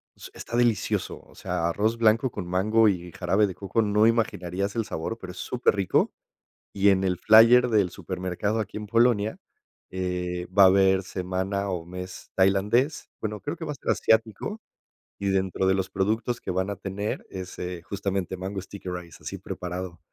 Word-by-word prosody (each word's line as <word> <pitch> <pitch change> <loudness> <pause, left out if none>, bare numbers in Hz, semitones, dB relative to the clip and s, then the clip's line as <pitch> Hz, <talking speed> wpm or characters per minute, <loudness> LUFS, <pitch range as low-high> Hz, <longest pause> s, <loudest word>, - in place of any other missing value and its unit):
s - - -11
está 120 - -5
delicioso, 120 -4 0
o - - -21
sea, 85 -1 -2
arroz 110 +6 0
blanco 115 +2 +3
con 95 -4 -6
mango 105 +5 +3
y 90 -3 -3
jarabe 95 +4 +2
de 95 - -6
coco 100 +3 -1
no 105 +1 +3
imaginarías 100 -4 -1
el 115 -2 0
sabor, 110 +3 -4
pero 90 -1 -8
es 90 - -13
superrico. 105 -6 +1 0.6
Y 100 0 +4
en 95 -1 +2
el 95 -1 +1
flyer 115 +3 +7
del 105 -5 +3
supermercado 95 +4 -3
aquí 105 0 -5
en 105 0 -5
Polonia, 115 -1 +2 0.5
eh, 90 -1 -3
va 100 - +9
a - - +9
haber 95 0 +4
semana 95 +1 -2
o 90 -3 -3
mes 90 +1 -8
tailandés. 100 +9 +2
Bueno, 105 -1 -4
creo 145 +4 -4
que 165 - -6
va 150 - -3
a - - -6
ser 125 - -3
asiático, 110 - +1 0.6
y 100 0 -1
dentro 95 0 0
de 95 - +4
los 95 -1 -2
productos 110 +5 -1
que - - -7
van 95 +2 -1
a 100 - -3
tener 100 +2 -4
es, 95 -1 -7
eh, 90 -1 -5
justamente 95 -1 -3
mango 95 +1 -4
sticky 95 -1 -8
rice, 90 -2 -7
así - - -6
preparado, 90 -1 -6
95 Hz, 180 wpm, -26 LUFS, 90-110 Hz, 0.6 s, va